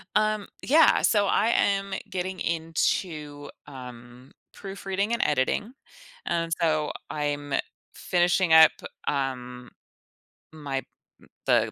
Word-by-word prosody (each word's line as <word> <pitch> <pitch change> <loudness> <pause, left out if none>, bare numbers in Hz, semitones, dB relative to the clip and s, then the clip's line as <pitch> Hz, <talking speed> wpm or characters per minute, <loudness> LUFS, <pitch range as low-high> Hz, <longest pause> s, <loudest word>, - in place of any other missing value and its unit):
Um, 215 -1 +1 0.2
yeah, 310 +3 +5
so, 205 -2 +3
I 220 - +2
am 195 -3 +1 0.2
getting 185 0 -4
into, 160 -2 -2 0.2
um, 125 -1 -11 0.2
proofreading 195 +1 -4
and 235 - 0
editing, 150 - 0 0.5
and, 165 -1 -1
so 155 -2 +1 0.2
I'm 145 -1 -2 0.4
finishing 175 -1 +1
up, 160 -1 +9 0.4
um, 125 -3 -3 0.8
my 145 -3 -4 0.4
m - - -19 0.2
the - - +3
160 Hz, 100 wpm, -26 LUFS, 145-195 Hz, 0.8 s, up